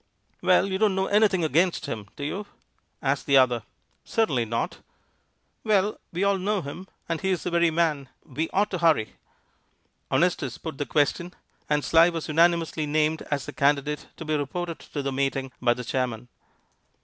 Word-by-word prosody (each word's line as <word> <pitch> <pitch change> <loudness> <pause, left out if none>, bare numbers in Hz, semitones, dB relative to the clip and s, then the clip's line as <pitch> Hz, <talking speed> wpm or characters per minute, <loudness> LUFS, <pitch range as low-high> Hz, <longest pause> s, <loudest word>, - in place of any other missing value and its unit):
"Well, - - +4
you 190 -1 -2
don't 210 -3 +3
know 190 0 +1
anything 200 -4 +3
against 165 +4 +2
him, 105 -2 -5
do 145 - -7
you?" 195 +8 -4 0.6
asked 140 0 0
the 140 -1 +5
other. 125 -3 +4 0.4
"Certainly 145 - +1
not." 115 +1 -2 0.9
"Well, 210 -1 +1
we 180 +3 -1
all 200 -1 +2
know 200 0 -1
him, 175 +7 -8 0.2
and 165 -1 -2
he 190 - 0
is 185 -3 0
the 180 - -2
very 170 0 +3
man. 155 -5 0 0.2
We 155 +5 -3
ought 205 +2 +1
to 185 - -2
hurry." 155 - +2 1.0
Honestus 160 -8 +1
put 160 -4 -7
the 145 - -2
question, 170 +4 0 0.3
and 150 -1 +1
Sly 165 +1 +6
was 165 -2 -4
unanimously 165 -1 +2
named 155 +1 +1
as 145 -2 -1
the 145 - -7
candidate 145 +1 +1
to 165 - -7
be 155 0 0
reported 165 +4 -3
to 145 - -6
the 135 - -1
meeting 135 0 -1
by 120 -1 +3
the 125 - -6
chairman. 125 -1 -3
155 Hz, 175 wpm, -26 LUFS, 140-180 Hz, 1.0 s, Sly